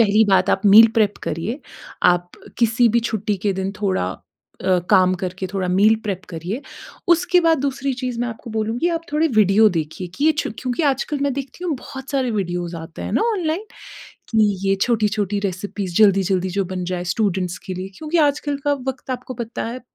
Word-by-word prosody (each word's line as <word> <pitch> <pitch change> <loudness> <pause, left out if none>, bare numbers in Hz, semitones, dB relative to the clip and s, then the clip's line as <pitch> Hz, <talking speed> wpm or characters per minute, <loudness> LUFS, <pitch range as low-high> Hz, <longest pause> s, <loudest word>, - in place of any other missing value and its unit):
पहली 215 0 +5
बात 185 -1 +4
आप - - +2
मील 215 +3 +9
प्रेप 210 -2 +2
करिए, 190 - -3 0.4
आप 175 0 +3 0.3
किसी 230 +1 +3
भी 235 +2 +2
छुट्टी 220 -3 -2
के 205 - +2
दिन 190 +1 -2
थोड़ा 190 - +1 0.6
अ, 185 -1 +2
काम 185 -2 +5
करके 185 +1 -3
थोड़ा 190 -2 -1
मील 200 +5 +4
प्रेप 195 -3 -3
करिए, 180 - -4 0.5
उसके 360 +1 +4
बाद 330 -2 +3
दूसरी 275 0 -1
चीज़ 250 -2 -4
मैं 240 - -1
आपको 230 0 -8
बोलूँगी 225 +8 -1
आप 330 -1 -1
थोड़े 315 +2 +2
वीडियो 215 +1 +6
देखिए 160 +4 -5
कि 285 - -2
ये 315 - +6
छु - - -1
क्योंकि 255 +4 -2
आजकल 275 +2 -3
मैं 285 -1 +1
देखती 275 +6 -6
हूँ 340 -4 0
बहुत 265 +1 -9
सारे 265 -3 0
वीडियोज़ 175 -4 -2
आते 165 0 -8
हैं - - -4
ना - - +2
ऑनलाइन, 355 -1 -2 0.7
कि 215 -3 +3
ये 195 - +4
छोटी-छोटी 210 -3 +1
रेसिपीज़ 185 -1 -5
जल्दी-जल्दी 195 -3 +3
जो 195 - +2
बन 185 0 -4
जाए 175 -1 -3
स्टूडेंट्स 190 -4 -1
के 185 - -4
लिए 185 +1 -5
क्योंकि 315 +2 -1
आजकल 285 0 -2
का 290 - +2 0.2
वक़्त 265 0 -5
आपको 255 0 -5
पता 235 0 -5
है 240 +3 -5
215 Hz, 195 wpm, -21 LUFS, 190-260 Hz, 0.7 s, मील